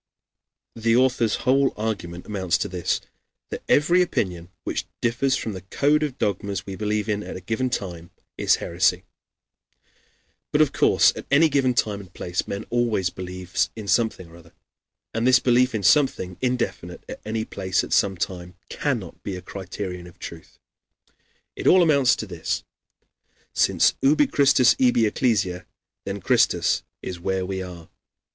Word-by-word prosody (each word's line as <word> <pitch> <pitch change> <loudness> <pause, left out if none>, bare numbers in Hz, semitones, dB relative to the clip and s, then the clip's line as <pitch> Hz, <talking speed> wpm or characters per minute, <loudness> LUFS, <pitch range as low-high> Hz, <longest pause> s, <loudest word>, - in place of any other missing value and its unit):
"] - - -64 0.3
The 115 0 +2
author's 125 -3 +2
whole 135 +1 +3
argument 100 -6 -4
amounts 95 -5 0
to - - -2
this: 90 -1 -1 0.5
that - - -4
every 170 +5 +4
opinion 90 - -2
which - - -3
differs 125 +3 +1
from 110 - -3
the 95 - -7
code 145 - +1
of 145 -4 -2
dogmas 100 -1 -2
we 95 - -6
believe 105 +1 -1
in 105 -1 -1
at - - -7
a - - -5
given 110 +8 -2
time, 85 -8 -5 0.3
is - - +3
heresy. - - 0 1.5
But - - +2
of - - +3
course - - +4
at - - -8
any 155 +4 +5
given 135 -3 +2
time 105 -3 0
and 95 -2 -12
place 90 0 -3
men 100 +2 -4
always 115 -7 +1
believe 90 0 -3
in 110 -2 -8
something 110 -5 +1
or 85 - -14
other; 85 -1 -18 0.6
and 115 +2 0
this 130 -1 +7
belief 125 0 +2
in 105 - -2
something, 95 -4 +3
indefinite 120 -8 -2
at - - -8
any 110 0 -3
place, 95 -2 -1
at - - -4
some 95 -2 +2
time, 90 0 -5
cannot 120 - -3
be 100 - -5
a 90 - -7
criterion 95 -2 -6
of 85 - -16
truth. 80 -1 -10 1.0
It - - -3
all 185 -1 +7
amounts 140 -7 +4
to - - -5
this: 85 -5 -3 0.9
since - - +3
ubi 150 - +4
Christus 140 - +4
ibi 120 -3 +4
Ecclesia, 105 -6 0 0.4
then - - -4
Christus - - +2 0.2
is 90 -2 -5
where 95 +1 -1
we 95 0 -3
are. 90 -3 -9
105 Hz, 165 wpm, -24 LUFS, 90-125 Hz, 1.5 s, this